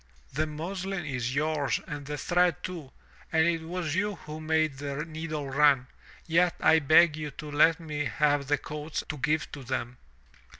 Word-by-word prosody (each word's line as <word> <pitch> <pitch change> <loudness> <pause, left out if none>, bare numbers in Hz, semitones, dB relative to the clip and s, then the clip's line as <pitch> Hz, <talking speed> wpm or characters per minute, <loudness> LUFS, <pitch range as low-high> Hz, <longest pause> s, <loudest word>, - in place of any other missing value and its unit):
The 155 - 0
muslin 180 +4 -4
is 125 -2 -2
yours 150 -1 +1
and 145 -1 -6
the 150 0 -3
thread 175 +4 +1
too, 165 -7 -6 0.4
and 160 0 +4
it 165 -1 +1
was 165 -2 -3
you 205 +3 0
who 155 -2 -9
made 155 -3 +1
the 145 +1 -3
needle 155 -2 -5
run, 140 -1 +4 0.4
yet 170 +1 +3
I 160 - +5
beg 155 +2 +5
you 155 -1 -5
let 150 +3 +3
me 150 -3 -3
have 145 +4 +1
the 145 +1 +2
coats 150 +1 -5
to 150 - -3
give 150 0 0
to 145 - -7
them." 125 -1 -3
155 Hz, 170 wpm, -28 LUFS, 145-165 Hz, 0.4 s, I